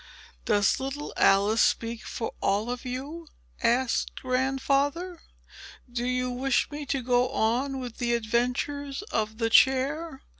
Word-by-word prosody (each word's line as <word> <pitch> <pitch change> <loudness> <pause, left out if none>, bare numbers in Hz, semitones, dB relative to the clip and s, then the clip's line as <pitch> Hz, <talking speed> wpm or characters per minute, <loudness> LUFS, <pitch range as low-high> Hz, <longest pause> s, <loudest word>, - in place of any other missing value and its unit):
"Does 205 +4 +3
little 275 +2 -5
Alice 200 +3 +4
speak 230 0 +1
for 225 - -4
all 205 +5 +1
of 250 +1 -6
you?" 285 +7 -6 0.3
asked 240 +1 +1
Grandfather. 275 +6 0 0.7
"Do 240 0 -2
you 250 0 0
wish 260 +3 0
me 290 -1 -6
to 265 -1 -1
go 245 0 +2
on 265 +3 0
with 245 -3 -7
the 240 -1 +1
adventures 250 - -1
of 220 0 -1
the 225 -1 0
chair?" 270 +4 +3
255 Hz, 135 wpm, -27 LUFS, 235-275 Hz, 0.7 s, Alice